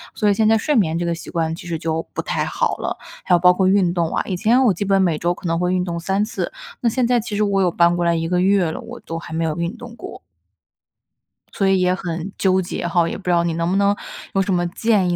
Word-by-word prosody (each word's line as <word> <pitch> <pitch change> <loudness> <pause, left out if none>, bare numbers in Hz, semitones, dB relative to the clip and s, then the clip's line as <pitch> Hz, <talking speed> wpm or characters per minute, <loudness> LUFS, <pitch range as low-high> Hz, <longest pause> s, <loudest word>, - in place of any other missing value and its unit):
所 210 - +2
以 - - +4
现 215 +2 +2
在 225 0 +5
睡 295 +6 0
眠 165 -8 +2
这 175 - -2
个 170 - 0
习 165 - -10
惯 165 -1 -1
其 175 +1 -10
实 165 -2 -2
就 160 0 -3
不 - - -2
太 - - -2
好 - - -1
了。 - - -3 0.3
还 180 - +3
有 - - +3
包 180 +1 +6
括 185 0 +1
运 190 -3 +3
动 170 -2 -1
啊， - - 0
以 190 - -2
前 235 +7 +3
我 220 - +4
基 180 - -3
本 195 0 +3
每 170 -5 +2
周 175 +2 0
可 175 - -13
能 165 0 0
会 180 +1 0
运 180 -1 +1
动 170 -2 -3
3 195 +4 0
次， 215 - -4 0.3
那 235 - +2
现 250 +2 0
在 245 0 +3
其 215 -2 -5
实 210 - +1
我 200 -1 +1
有 185 - +3
搬 170 0 +3
过 175 - 0
来 170 0 +2
1 165 0 -1
个 180 0 +1
月 190 -3 +3
了， - - -6
我 - - -9
都 165 0 -5
还 165 - -9
没 165 +1 -1
有 160 -2 -1
运 170 +1 -2
动 240 -1 -10
过。 215 - -9 1.3
所 195 - +1
以 195 -1 +3
也 180 0 +3
很， 175 0 -4
纠 190 -1 +2
结 175 -1 -4
哈， 170 -1 +2
也 - - -4
不 - - -14
知 180 - 0
道 170 -1 +3
你 170 -1 -1
能 170 +1 -1
不 185 - 0
能 200 0 +3 0.4
有 195 - +2
什 195 0 0
么 175 -1 +1
建 200 0 +1
议， 175 - +1
180 Hz, 310 characters per minute, -20 LUFS, 170-200 Hz, 1.3 s, 包